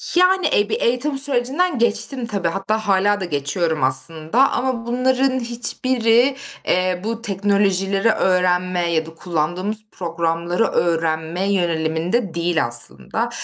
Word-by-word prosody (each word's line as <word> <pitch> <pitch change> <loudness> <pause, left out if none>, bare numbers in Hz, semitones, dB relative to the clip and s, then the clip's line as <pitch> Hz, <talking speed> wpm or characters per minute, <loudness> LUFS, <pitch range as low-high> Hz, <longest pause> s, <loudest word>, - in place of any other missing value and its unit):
Yani, 365 +1 +3
eee, 205 +1 +1
bir - - -2
eğitim 260 +4 0
sürecinden 275 +5 +1
geçtim 235 +2 +1
tabii. 200 -6 -2
Hatta 205 +5 -2
hâlâ 200 +1 +2
da 190 - -3
geçiyorum 155 0 -1
aslında. 160 - +2
Ama 250 -2 -2
bunların 260 +2 +1
hiçbiri, 240 +1 +1 0.3
eee, 185 0 +1
bu 225 +1 -4
teknolojileri 200 -1 +1
öğrenmeye 180 -2 +1
ya 160 -1 0
da 165 - -11
kullandığımız 175 +5 -1
programları 170 +2 -2
öğrenme 165 +2 -1
yöneliminde 170 +3 -1
değil 170 -3 0
aslında. 120 0 -2
195 Hz, 120 wpm, -20 LUFS, 170-235 Hz, 0.3 s, Yani